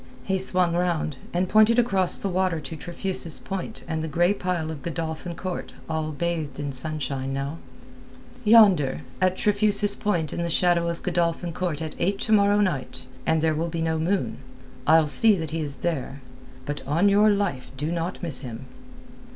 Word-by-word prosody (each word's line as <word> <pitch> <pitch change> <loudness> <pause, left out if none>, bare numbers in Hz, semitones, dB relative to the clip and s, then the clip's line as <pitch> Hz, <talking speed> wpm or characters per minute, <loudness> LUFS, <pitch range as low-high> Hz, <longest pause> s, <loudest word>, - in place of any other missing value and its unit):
He 190 -1 -1
swung 180 -2 +1
round, 170 -5 -1
and 180 +1 0
pointed 215 +4 +5
across 195 -7 +5
the - - -3
water 185 -3 0
to 160 +2 -7
Trefusis 175 +1 -3
Point 195 +3 -6
and 160 -1 -2
the - - -3
grey 175 +5 +2
pile 180 -5 -2
of 150 -3 -7
Godolphin 165 +1 -4
Court 185 +1 -5
all 160 -1 -2
bathed 155 -3 -3
in 145 -1 -3
sunshine 135 -1 -3
now. 140 +4 -4 0.8
"Yonder, 200 - +5 0.2
at 185 0 +2
Trefusis 205 0 +2
Point 170 -8 -1
in - - -3
the 170 - -2
shadow 170 0 +2
of 170 - -5
Godolphin 170 -1 -1
Court 165 -3 -2
at 160 - -5
eight 195 +3 0
to 220 - -1
morrow 205 -1 +4
night, 130 -9 -2 0.2
when 160 -1 +2
there 160 0 +2
will 165 +2 -2
be 165 0 -3
no 160 -1 0
moon. 185 +4 -1 0.5
I'll 160 0 +5
see 215 +8 +5
that 160 -4 -4
he 165 0 -2
is 145 -2 +1
there. 140 -4 -3 0.4
But 145 0 -4
on 165 +8 +3
your 205 +2 +5
life 200 -11 -1
do 150 +4 -2
not 175 +2 -3
miss 165 -6 +2
him." 125 -1 -8
170 Hz, 180 wpm, -25 LUFS, 155-190 Hz, 0.8 s, pointed